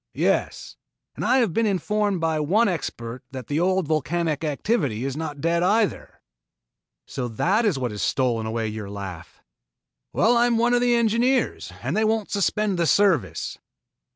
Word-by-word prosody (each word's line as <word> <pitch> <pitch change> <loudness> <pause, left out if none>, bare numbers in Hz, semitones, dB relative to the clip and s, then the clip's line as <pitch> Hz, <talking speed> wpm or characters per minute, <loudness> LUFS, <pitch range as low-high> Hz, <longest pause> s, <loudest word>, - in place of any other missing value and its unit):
"Yes, - - -1 0.4
and - - -5
I 260 - +3
have 230 -10 +2
been 225 0 +2
informed 205 0 0
by 160 -1 0
one 200 +10 +2
expert 125 - -4
that 130 -2 -7
the 145 +5 -1
old 185 -1 +1
volcanic 155 0 -1
activity 145 - -1
is 135 -1 -3
not 150 -2 -5
dead 170 +2 +1
either." 210 +3 0 0.8
"So 125 -2 -4
that 190 - +1
is 195 -9 +2
what 125 -3 -2
has 105 - -5
stolen 120 -4 0
away 110 0 -2
your 105 -2 -6
laugh?" 95 -4 -8 0.7
"Well 235 +3 +3
I 240 +1 +4
am 235 -1 +1
one 240 +1 +2
of 245 - +3
the 245 -1 +3
engineers 235 +3 +1
and 135 +8 -2
they 215 - +2
won't 220 -1 0
suspend 200 -1 0
the 170 - +2
service." 155 - +1
170 Hz, 170 wpm, -24 LUFS, 130-215 Hz, 0.8 s, I